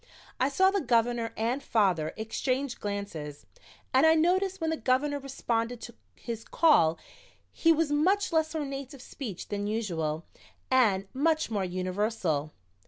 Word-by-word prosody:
I 260 - +2
saw 380 +7 +4
the 400 -1 0
Governor 235 -2 +1
and 235 +5 -1
father 185 - +1
exchange 255 +4 -2
glances 200 -8 -5 0.5
and 260 - +5
I 320 0 +6
noticed 375 +4 +2
when 320 -1 -1
the - - 0
Governor 285 +1 0
responded 240 -3 -2
to 235 - -8 0.2
his 230 -2 -6
call 170 - +4 0.5
he 330 - +3
was 320 -2 +2
much 365 +7 +2
less 315 0 +1
ornate 275 -2 -4
of 265 - -13
speech 230 - -7
than 205 0 -2
usual 170 -8 -2 0.5
and 205 -7 +3
much 310 -1 +1
more 205 -3 0
universal. 185 -4 -1
240 Hz, 145 wpm, -28 LUFS, 200-295 Hz, 0.5 s, I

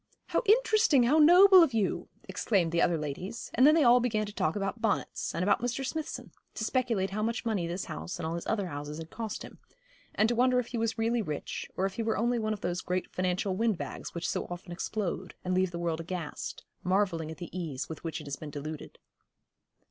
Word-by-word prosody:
'How - - +2
interesting, 430 - +5
how 285 +7 +4
noble 365 +4 +9
of 275 -8 +3
you,' 210 -3 0 0.2
exclaimed 185 -7 +1
the 170 0 +2
other 170 - +3
ladies; 160 +9 -5
and 255 +4 +6
then 305 - +7
they 315 -4 +4
began 220 -3 0
to 205 - -8
talk 155 -6 0
about 195 +2 -3
bonnets, 220 -3 -1
and 170 - 0
about 200 - +3
Mr. 245 +2 -2
Smithson, 315 +3 -5 0.2
to - - -3
speculate 225 -6 0
how 210 +2 -2
much 230 +2 -1
money 205 -7 0
this 175 +2 -3
house 180 - -6
and 175 - -4
all 160 - -2
his 170 - -5
other 205 -3 0
houses 145 -2 -6
had 160 0 -8
cost 225 -2 -5
him, - - -12 0.6
and 215 - +4
to 240 - +1
wonder 250 +1 +3
if 245 - -3
he 245 - -3
was 225 0 -1
really 230 +1 +1
rich, 155 -7 -5
or 190 - +1
if 195 - -4
he - - 0
were 225 0 0
only 240 +1 +1
one 215 -1 -1
of 210 -2 -3
those 175 -1 -2
great 180 0 -2
financial 185 +1 0
windbags 220 -5 -2
which 170 +1 -2
so - - -2
often 175 0 -8
explode 190 +1 -3
and 185 - 0
leave 185 0 +2
the 175 - -6
world 165 -1 -1
aghast, 170 -2 -5 0.2
marvelling 180 -4 +1
at 160 - -7
the 175 +1 -8
ease 155 -7 -4
with 160 - -8
which 165 -1 -3
it 150 - -10
has 140 -1 -4
been 155 - -8
deluded. 150 +1 -7
195 Hz, 225 wpm, -30 LUFS, 170-235 Hz, 0.6 s, noble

